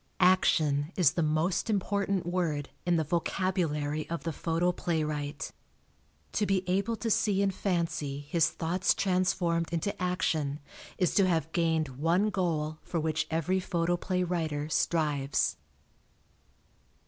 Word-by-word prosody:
Action 155 Hz, -5 st, +3 dB
is 175 Hz, -7 st, +5 dB
the 170 Hz, -, -1 dB
most 155 Hz, +7 st, +1 dB
important 200 Hz, -2 st, 0 dB
word 170 Hz, -5 st, -1 dB, 0.2 s
in 175 Hz, -, +4 dB
the 160 Hz, -, +2 dB
vocabulary 155 Hz, -3 st, -1 dB
of 165 Hz, -4 st, -3 dB
the 165 Hz, -, -2 dB
photoplaywright. 160 Hz, -3 st, -1 dB, 0.8 s
To 210 Hz, -, +1 dB
be 190 Hz, -1 st, 0 dB
able 200 Hz, +5 st, +1 dB
to 225 Hz, 0 st, -2 dB
see 210 Hz, -3 st, +2 dB
in 195 Hz, -, +2 dB
fancy 165 Hz, -7 st, -2 dB
his 150 Hz, +3 st, +2 dB
thoughts 175 Hz, +3 st, 0 dB
transformed 180 Hz, -3 st, +1 dB
into 170 Hz, +4 st, -2 dB
action 160 Hz, -5 st, 0 dB, 0.4 s
is 180 Hz, -3 st, +1 dB
to 195 Hz, -2 st, +4 dB
have 160 Hz, -3 st, 0 dB
gained 160 Hz, -6 st, 0 dB
one 175 Hz, +7 st, +2 dB
goal 155 Hz, -5 st, -1 dB
for 170 Hz, -, -3 dB
which 160 Hz, 0 st, -1 dB
every 165 Hz, +4 st, +1 dB
photoplay 175 Hz, +1 st, 0 dB
writer 160 Hz, -4 st, -2 dB
strives. 150 Hz, -4 st, +1 dB
170 Hz, 125 wpm, -29 LUFS, 155-185 Hz, 0.8 s, is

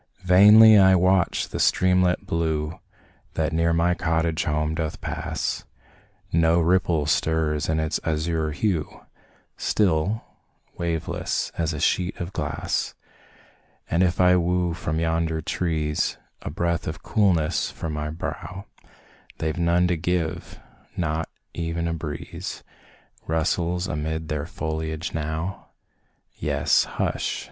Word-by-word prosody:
Vainly 105 Hz, +4 st, +8 dB
I 95 Hz, -1 st, +6 dB
watch 95 Hz, 0 st, +2 dB
the -, -, -5 dB
streamlet 90 Hz, -1 st, +3 dB
blue 80 Hz, -1 st, -1 dB, 0.6 s
That 80 Hz, 0 st, 0 dB
near 85 Hz, +1 st, +2 dB
my 85 Hz, +1 st, +2 dB
cottage 80 Hz, -1 st, 0 dB
home 75 Hz, +1 st, 0 dB
doth 80 Hz, -1 st, -3 dB
pass, -, -, -3 dB, 0.7 s
No 85 Hz, +1 st, +4 dB
ripple 85 Hz, -2 st, +2 dB
stirs 80 Hz, 0 st, 0 dB
its 80 Hz, -1 st, 0 dB
azure 80 Hz, 0 st, -1 dB
hue, 80 Hz, -1 st, -2 dB, 0.6 s
Still 100 Hz, +2 st, +1 dB, 0.5 s
waveless, 85 Hz, -2 st, -2 dB
as 80 Hz, -2 st, -1 dB
a 75 Hz, -, -4 dB
sheet 90 Hz, +4 st, +1 dB
of 90 Hz, +2 st, -5 dB
glass -, -, -2 dB, 1.0 s
And 85 Hz, -, +2 dB
if 90 Hz, -2 st, +2 dB
I 90 Hz, 0 st, +6 dB
woo 90 Hz, 0 st, +1 dB
from 80 Hz, -2 st, -2 dB
yonder 80 Hz, -1 st, 0 dB
trees 80 Hz, -1 st, -1 dB, 0.2 s
A -, -, -5 dB
breath 85 Hz, +2 st, -1 dB
of 80 Hz, 0 st, -5 dB
coolness 90 Hz, -7 st, +1 dB
for -, -, -6 dB
my 75 Hz, 0 st, -3 dB
brow, 90 Hz, +3 st, -6 dB, 0.7 s
They've 80 Hz, +1 st, -2 dB
none 85 Hz, +1 st, +3 dB
to 90 Hz, -1 st, 0 dB
give 85 Hz, -1 st, -2 dB, 0.4 s
not 80 Hz, -2 st, -1 dB, 0.3 s
e'en 85 Hz, 0 st, -2 dB
a 85 Hz, -, -1 dB
breeze 75 Hz, -3 st, -6 dB, 0.6 s
Rustles 85 Hz, +2 st, 0 dB
amid 80 Hz, 0 st, -3 dB
their 75 Hz, 0 st, -2 dB
foliage 80 Hz, -1 st, -4 dB
now; 80 Hz, +4 st, -4 dB, 0.7 s
Yes, -, -, +2 dB
hush! -, -, -2 dB
85 Hz, 120 wpm, -24 LUFS, 80-90 Hz, 1.0 s, Vainly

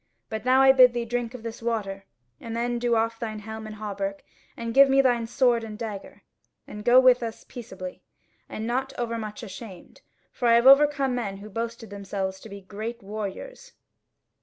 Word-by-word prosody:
But 220 Hz, +2 st, -5 dB
now 260 Hz, +1 st, +5 dB
I 265 Hz, -, +8 dB
bid 255 Hz, -2 st, +6 dB
thee 240 Hz, -1 st, -2 dB
drink 240 Hz, +1 st, -3 dB
of 235 Hz, -, -10 dB
this 230 Hz, 0 st, -7 dB
water, 205 Hz, -4 st, -3 dB, 0.3 s
and 230 Hz, 0 st, -6 dB
then 240 Hz, 0 st, -1 dB
do 240 Hz, -1 st, +1 dB
off 225 Hz, 0 st, 0 dB
thine 220 Hz, -2 st, -4 dB
helm 220 Hz, +1 st, -8 dB
and 215 Hz, -, -8 dB
hauberk 200 Hz, -2 st, -5 dB, 0.3 s
and 230 Hz, 0 st, -4 dB
give 275 Hz, +1 st, +7 dB
me 270 Hz, 0 st, +4 dB
thy 245 Hz, -3 st, +3 dB
sword 240 Hz, 0 st, +2 dB
and 215 Hz, -1 st, -7 dB
dagger, 210 Hz, -4 st, -7 dB, 0.4 s
and 210 Hz, 0 st, -9 dB
go 245 Hz, +2 st, +7 dB
with 255 Hz, -1 st, +5 dB
us 225 Hz, -1 st, -6 dB
peaceably; 190 Hz, -6 st, -9 dB, 0.5 s
and 215 Hz, -, -6 dB
be -, -, -3 dB
not 260 Hz, +3 st, -2 dB
overmuch 230 Hz, -2 st, -4 dB
ashamed, 195 Hz, -3 st, -11 dB, 0.3 s
for 245 Hz, -, -2 dB
I 230 Hz, -, +6 dB
have 235 Hz, +1 st, +3 dB
overcome 275 Hz, -1 st, +6 dB
men 210 Hz, -6 st, -3 dB
who 210 Hz, +2 st, -11 dB
boasted 230 Hz, 0 st, -5 dB
themselves 195 Hz, -1 st, -4 dB
to 220 Hz, -, -12 dB
be 200 Hz, 0 st, -9 dB
great 215 Hz, +4 st, -7 dB
warriors." 215 Hz, -, -7 dB
230 Hz, 190 wpm, -25 LUFS, 210-245 Hz, 0.5 s, I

